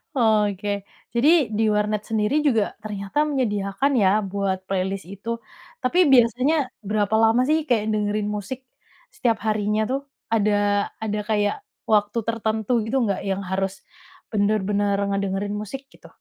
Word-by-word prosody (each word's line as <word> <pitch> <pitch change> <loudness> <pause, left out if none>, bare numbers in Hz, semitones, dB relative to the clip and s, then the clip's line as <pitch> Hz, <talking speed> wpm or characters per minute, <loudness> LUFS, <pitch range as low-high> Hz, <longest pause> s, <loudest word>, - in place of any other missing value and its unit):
Oke, 210 -4 +2 0.5
jadi 240 +4 +3 0.3
di 225 - +2
warnet 210 0 0
sendiri 220 +4 +1
juga 225 -6 +3 0.2
ternyata 200 +1 -5
menyediakan 235 -2 0
ya 190 - +5 0.2
buat 195 -1 0
playlist 190 0 -2
itu. 200 +4 -8 0.5
Tapi 290 +8 +2
biasanya 250 +5 +4 0.3
berapa 210 0 +1
lama 225 +2 +4
sih 310 - +4
kayak 225 -5 +2
dengerin 210 0 0
musik 210 +6 -5 0.6
setiap 230 -3 +1
harinya 210 0 +1
tuh? 265 +1 0 0.3
Ada 215 -2 +3 0.5
ada 210 -1 -1
kayak 205 -1 +1 0.4
waktu 205 +1 +2
tertentu 220 -1 -1
gitu 225 - -3
nggak 200 -3 -1
yang 195 0 0
harus 190 0 -1 0.6
bener-bener 205 -1 +1
ngedengerin 200 +1 -1
musik 235 +6 -6
gitu? - - -16
210 Hz, 135 wpm, -23 LUFS, 200-225 Hz, 0.6 s, ya